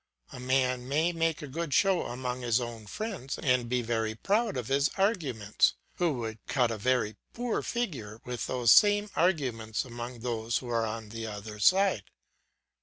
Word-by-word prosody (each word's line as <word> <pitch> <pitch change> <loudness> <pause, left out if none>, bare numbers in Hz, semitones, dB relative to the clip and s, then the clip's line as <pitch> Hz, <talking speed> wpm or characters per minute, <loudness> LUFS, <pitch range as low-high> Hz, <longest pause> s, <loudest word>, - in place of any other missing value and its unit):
A - - -8
man 125 -1 0
may 160 +5 +2
make 165 -2 0
a - - -5
good 155 +1 -2
show 195 -3 +3
among 125 +1 -4
his 120 0 +2
own 115 -3 -6
friends, 205 - -4
and 125 -3 +1
be 125 0 +1
very 110 -1 -1
proud 210 - 0
of 120 -3 -3
his 140 +2 +2
arguments, 145 - +1 0.2
who 175 -3 +2
would 115 -3 -5
cut 125 -4 +2
a 115 - -3
very 125 -2 +1 0.2
poor 240 -1 -1
figure 135 - -3
with 125 -1 -4
those 125 -2 +3
same 205 0 +6
arguments 130 - 0
among 120 -1 -7
those 115 -1 -1
who 125 - -6
are 115 -1 +1
on 110 0 -5
the 115 +1 -5
other 105 0 -7
side. 185 - +4
125 Hz, 175 wpm, -29 LUFS, 115-165 Hz, 0.2 s, same